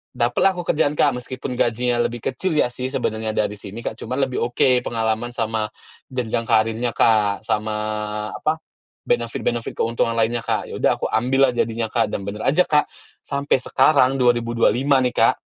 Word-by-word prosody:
dapatlah 125 +11 +2
aku 175 - -4
kerjaan 150 0 +1
Kak, 145 - +4
meskipun 130 +1 -6
gajinya 120 +1 +1
lebih 120 - -7
kecil 165 +6 -2
ya 150 - +3
sih 125 +1 -4
sebenarnya 110 -4 -2
dari 105 -1 0
sini 105 +4 -8
Kak, 110 - -4
cuma 125 +3 -4
lebih 135 -2 0
oke 125 +1 +3
pengalaman 115 +1 -1
sama 110 -1 -1 0.4
jenjang 120 -2 -2
karirnya 115 +1 +1
Kak, 105 -2 +3
sama 105 0 -1 0.6
apa, 160 +1 -1 0.4
benefit 120 0 -1
benefit, 120 -1 -2
keuntungan 115 0 0
lainnya, 115 +1 +1
Kak. 115 -2 -1
Ya - - -6
udah, - - +3
aku - - -1
ambil 130 +3 +3
lah - - -10
jadinya, 115 -1 -1
Kak. 115 -2 +2
Dan 100 - -3
bener 105 +1 -5
aja 155 +7 +4
Kak, 150 -3 +2 0.4
sampai 140 0 0
sekarang, 135 -1 +3
2025 120 +2 +2
nih 125 - +1
Kak, - - +4
120 Hz, 175 wpm, -21 LUFS, 110-130 Hz, 0.6 s, Kak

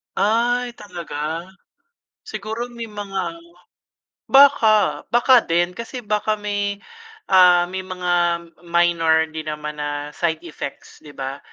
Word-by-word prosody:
Ay, 240 +3 +1
talaga? 170 -4 -5 0.8
Siguro 220 - -5
may 230 -1 -7
mga 205 +9 -4 0.9
baka, 265 -6 +5
baka 240 +2 +5
din. 175 -2 0
Kasi 235 +4 -7
baka 210 +1 0
may, 205 -1 -2 0.6
ah, 180 -2 +7
may 190 - -3
mga 175 -2 0 0.2
minor 170 -2 +3
din 155 0 -6
naman 150 0 -5
na 145 0 -4
side 160 +1 -2
effects, 155 -4 -8
'di 145 -2 -14
ba, 135 +1 -5
180 Hz, 115 wpm, -21 LUFS, 160-215 Hz, 0.9 s, ah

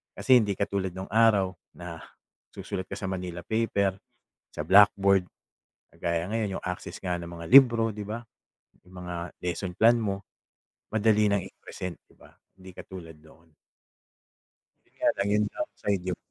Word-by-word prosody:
Kasi 130 -2 +5
hindi 105 -3 0
katulad 100 -2 -2
nung 95 +1 -6
araw 110 -4 +4 0.2
na - - -8 0.6
susulat 95 0 -5
ka - - -6
sa 95 - -4
Manila 90 -2 -5
paper, 100 -2 0 0.5
sa 75 - -5
blackboard. 100 -1 +6 0.7
Kagaya 85 0 -2
ngayon 105 -2 -2
yung - - -12
access 90 +1 -5
nga 90 -1 -2
ng 85 0 -7
mga 85 -1 -8
libro, 115 -3 +6
di 105 - -5
ba, 110 +3 -5 0.7
yung 95 - -16
mga 85 -1 -6
lesson 90 +1 -3
plan 115 +4 +5
mo, 100 -3 -2 0.7
madali 110 -1 +3
ng 100 -2 +1
i-present, 90 -1 -8
di - - -25
ba? - - -18 0.3
Hindi 95 0 -12
katulad 85 -4 -10
noon. 80 +1 -20 1.5
Yun - - -32
nga - - +4
lang 100 +1 0
yung 105 0 +3
downside, 100 - -3
yung 90 -2 -2
95 Hz, 155 wpm, -27 LUFS, 90-105 Hz, 1.5 s, blackboard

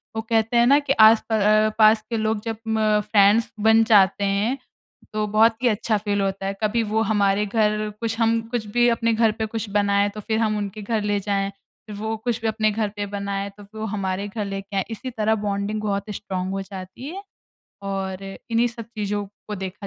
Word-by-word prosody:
वो 220 - -1
कहते 225 +1 +1
हैं 235 - +5
ना, 280 +3 +6
कि 280 -2 0
आस 220 -2 +6
प - - -1
अ, 215 0 +4
पास 215 0 +6
के 230 - -1
लोग 220 -1 0
जब 225 -1 -3
म 215 -1 +2
फ्रेंड्स 210 +1 +3
बन 220 +1 +5
जाते 205 -3 +4
हैं, 200 +6 0 0.6
तो 215 0 0
बहुत 220 +2 +4
ही - - +4
अच्छा 220 0 +1
फ़ील 205 0 -1
होता 195 0 -2
है। 195 - -1
कभी 225 +2 +1
वो 220 - +2
हमारे 200 0 +2
घर 215 0 0
कुछ 225 -1 -2
हम, 230 0 +2
कुछ 240 -3 -2
भी 240 0 +5
अपने 230 0 +1
घर 225 0 +3
पे - - +1
कुछ 220 -1 -5
बनाए, 200 0 +2
तो 210 +1 -9
फिर 220 +1 -1
हम 215 -2 +1
उनके 205 +1 -5
घर 220 +1 -1
ले 205 0 0
जाएँ। 195 0 -1 0.5
वो 220 +2 -3
कुछ 235 +1 -2
भी 225 - -1
अपने 215 0 +1
घर 215 0 -1
पे 205 - -3
बनाए, 200 0 -4
तो 205 - -12
फिर 210 +2 -12
वो 220 - -3
हमारे 195 -1 -2
घर 205 0 -4
लेके 195 0 -6
आए। 190 - +2
इसी 240 +4 -5
तरह 220 -2 +1
बॉन्डिंग 200 +1 -2
बहुत 200 0 -2
स्ट्रांग 185 -2 -4
हो 195 0 -2
जाती 190 +6 -9
है। 395 - -7 0.6
और, 195 -1 -4
इन्हीं 230 +4 -1
सब 230 -1 -8
चीज़ो 205 -1 -2 0.2
को 210 - -3
देखा 195 +1 -6
215 Hz, 220 wpm, -23 LUFS, 200-225 Hz, 0.6 s, ना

